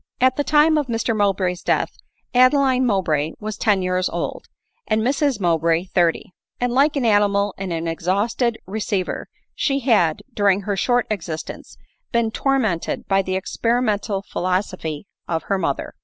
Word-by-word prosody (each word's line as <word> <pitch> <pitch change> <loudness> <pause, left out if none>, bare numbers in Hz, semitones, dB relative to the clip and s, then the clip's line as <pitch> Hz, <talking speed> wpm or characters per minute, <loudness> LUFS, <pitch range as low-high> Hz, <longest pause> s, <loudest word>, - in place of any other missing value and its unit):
At 255 0 +4
the 290 - 0
time 305 +1 +4
of 290 - -2
Mr 230 -1 -1
Mowbray's 190 -3 0
death, - - 0 0.4
Adeline 255 0 +4
Mow 195 -4 +1
bray 155 -1 -1
was 215 0 -5
ten 205 -4 +1
years 185 0 0
old, - - -4 0.4
and 215 0 +1
Mrs 275 -1 +1
Mowbray 165 -2 +2
thirty; 175 0 +1 0.3
and 245 0 0
like 285 +4 +3
an 270 -4 0
animal 205 -2 +3
in 195 -2 -5
an 165 0 -2
exhausted 205 +8 0
receiver, 200 -1 -3 0.2
she 275 -1 0
had, 205 - +2
during 200 -2 +2
her 200 0 -2
short 245 +3 +1
existence, 165 -6 -5 0.3
been 235 -2 +1
tormented 225 -11 -1
by 195 0 +3
the 185 0 -3
experimental 210 0 -1
philosophy 185 -4 -2 0.2
of 165 -1 -2
her 195 -1 -1
mother. 140 -6 -2
205 Hz, 155 wpm, -21 LUFS, 185-245 Hz, 0.4 s, At